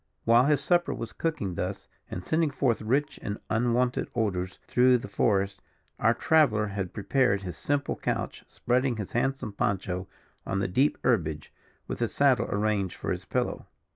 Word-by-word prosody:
While 115 +2 +6
his 145 0 +3
supper 175 -1 +2
was 115 - -6
cooking 155 - -2
thus, - - -4 0.2
and 90 - -5
sending 160 - +1
forth 130 -5 0
rich 135 +7 0
and 100 0 -4
unwonted 120 +2 +1
odours 95 -5 -1
through 125 0 +4
the 115 - -7
forest, 100 -1 0 0.4
our 115 +1 +3
traveller 115 -9 +3
had 95 -3 -3
prepared 105 -2 +1
his 90 -4 -5
simple 145 +6 -1
couch, - - -3
spreading 125 0 0
his 105 -3 -5
handsome 125 -3 -1
poncho 95 -2 -1 0.4
on 95 - -2
the 95 - 0
deep 130 +11 +2
herbage, 80 -11 0 0.3
with - - -4
his - - -2
saddle - - +3
arranged 100 -3 0
for - - -4
his - - -3
pillow. - - -2
110 Hz, 165 wpm, -28 LUFS, 100-130 Hz, 0.4 s, While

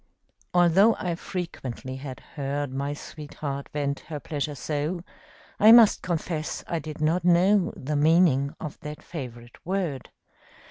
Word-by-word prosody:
Although 180 +6 +5
I 180 -3 -2
frequently 135 -8 -5
had 135 -2 -8
heard 140 -1 -3
My 140 +2 -2
sweetheart 145 -2 -6
vent 140 -1 -2
her 150 -2 -4
pleasure 150 0 -3
so, 155 +5 -3 0.6
I 215 +2 +8
must 230 -2 +7
confess 165 -2 -3
I 170 - -1
did 155 0 -8
not 165 +3 +2
know 180 +2 +4
The 150 +3 -3
meaning 150 -2 +3
of 150 - -7
that 150 -2 -8
favorite 120 -7 -9
word. 175 -8 -2
155 Hz, 135 wpm, -26 LUFS, 140-175 Hz, 0.6 s, I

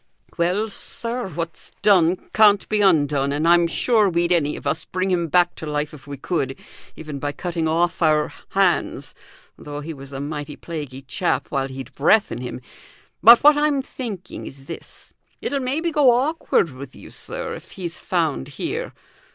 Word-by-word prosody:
"Well, 180 +6 +1
sir, 235 +2 -4
what's 165 -2 -6
done 180 -4 +5 0.2
can't 205 -2 +5
be 210 -1 +1
undone, 145 -7 +3
and 150 +3 0
I'm 170 0 +5
sure 215 +3 +3
we'd 170 0 0
any 150 -4 +2
of - - -10
us - - -1
bring 185 +1 -2
him 170 -2 +1
back 175 +2 +3
to 160 - -6
life 150 0 -2
if 150 -1 -13
we 140 -1 -6
could, 135 -3 -2 0.4
even 150 -3 -7
by 145 +1 -2
cutting 170 0 -2
off 170 +3 +1
our 155 -2 +2 0.2
hands, - - +1 0.5
though 145 0 -7
he 160 +2 -6
was 135 -1 -11
a 135 - -5
mighty 145 0 -5
plaguey 145 -5 -7
chap 175 +6 -1
while 135 -2 0
he'd 135 0 -8
breath 180 +11 +3
in 120 - -4
him. 125 0 -6 0.6
But 235 +2 +9
what 295 +1 +8
I'm 295 -2 +1
thinking 220 -9 -7
is 135 0 -11
this: - - -10 0.3
it'll 280 - -2
maybe 290 +6 -1
go 295 -4 +5
awkward 250 - +2
with 130 0 -10
you, - - -13
sir, - - -5
if - - -10
he's 175 -3 -6
found 160 - -1
here. - - -4
170 Hz, 175 wpm, -22 LUFS, 145-205 Hz, 0.6 s, But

